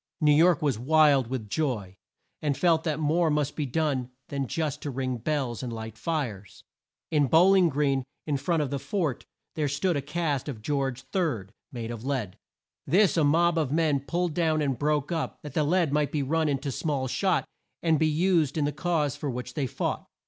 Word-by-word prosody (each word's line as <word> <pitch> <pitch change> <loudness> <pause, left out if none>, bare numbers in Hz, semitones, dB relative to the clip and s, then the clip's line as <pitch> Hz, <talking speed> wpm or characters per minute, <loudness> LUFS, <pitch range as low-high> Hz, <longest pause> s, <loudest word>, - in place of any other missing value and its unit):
New 150 -1 +4
York 165 +1 +4
was 135 -7 +1
wild 145 -1 +4
with 120 -3 -4
joy, 105 -8 -2 0.5
and 145 -3 0
felt 165 -2 +3
that 155 -2 -1
more 160 +2 +2
must 150 -1 0
be 150 -3 -2
done 135 -3 -1 0.2
than 140 -2 -2
just 155 +1 -2
to 145 - -4
ring 130 -1 -2
bells 130 -2 -2
and 125 -2 -4
light 110 -1 -6
fires. 115 - -4 0.5
In 145 -3 +3
Bow 165 +8 +6
ling 190 -3 +5
Green, 140 -2 +1 0.2
in 145 -2 0
front 165 +2 0
of 140 - -4
the 140 - -1
fort, 145 - -2 0.3
there 150 -2 -1
stood 155 +6 0
a 140 - 0
cast 150 -1 -2
of 110 -6 -7
George 135 -1 -1
Third, 130 - -1 0.2
made 120 -3 -5
of 115 -1 -7
lead. 130 -9 -2 0.5
This 190 +6 +4
a 165 - +3
mob 165 +3 +3
of 145 -4 -1
men 155 -2 +2
pulled 170 +4 -2
down 160 -1 +1
and 140 -3 0
broke 150 +2 0
up, 165 -2 -2
that 150 -3 -8
the 155 - +2
lead 165 -1 +2
might 150 -1 +1
be 145 -2 0
run 155 +3 +1
in 140 - +1
to 140 - -3
small 140 -1 -1
shot 185 +8 0 0.4
and 160 -3 +3
be 160 - +3
used 160 -2 +2
in 150 - +1
the 145 - 0
cause 155 -5 0
for 145 - -4
which 125 -1 -5
they 140 -4 -1
fought. - - -3
145 Hz, 205 wpm, -27 LUFS, 130-160 Hz, 0.5 s, Bow